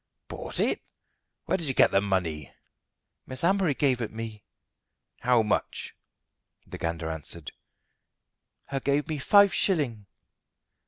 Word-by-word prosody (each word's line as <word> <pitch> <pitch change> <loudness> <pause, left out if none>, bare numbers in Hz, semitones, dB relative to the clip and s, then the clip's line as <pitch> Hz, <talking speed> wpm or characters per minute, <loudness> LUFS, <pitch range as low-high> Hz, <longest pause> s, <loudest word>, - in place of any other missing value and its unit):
"Bought - - -3
it! - - +1 0.6
Where - - 0
did 165 - -3
you 135 - 0
get - - +5
the 100 - +4
money?" 85 -8 -1 0.8
"Miss 130 +3 -6
Amory 185 -4 +3
gave 130 -4 +2
it 115 - -2
me." 110 -1 -6 0.8
"How 120 -2 +3
much?" 105 - -2 0.7
The - - -9
Gander 80 -1 -2
answered: 80 -1 -4 1.1
"Her 135 -1 -3
gave 140 +2 0
me 155 -2 -3
five 200 +7 +6
shilling." 125 - 0
120 Hz, 125 wpm, -27 LUFS, 95-145 Hz, 1.1 s, five